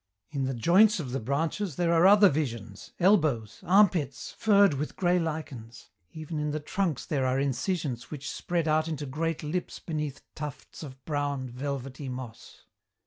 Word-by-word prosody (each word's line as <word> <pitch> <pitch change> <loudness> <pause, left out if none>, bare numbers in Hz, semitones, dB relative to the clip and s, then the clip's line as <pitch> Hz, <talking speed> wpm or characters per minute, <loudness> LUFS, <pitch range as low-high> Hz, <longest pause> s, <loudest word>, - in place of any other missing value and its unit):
In 140 -3 -1
the 130 0 -2
joints 190 - +5
of 135 -6 -5
the 135 - -1
branches 155 - -2
there 170 +1 +1
are 170 +2 +6
other 205 +1 +8
visions, 115 - -3
elbows, 155 - +2
armpits 175 -9 +2
furred 200 -4 +4
with 145 +2 -4
grey 180 -1 +2
lichens. 150 -8 -6 0.2
Even 155 0 -6
in 150 0 -1
the 150 +1 -2
trunks 165 0 -2
there 140 -6 0
are 130 +1 +1
incisions 140 -1 -2
which 145 -2 -7
spread 170 -3 -2
out 155 +1 +2
into 150 -3 -4
great 155 +4 -2
lips 170 +4 -3
beneath 150 -4 -5
tufts 150 -3 -8
of 135 -4 -10
brown, 145 -4 -2
velvety 135 +1 -5
moss. 125 -3 -9
150 Hz, 160 wpm, -28 LUFS, 130-170 Hz, 0.2 s, other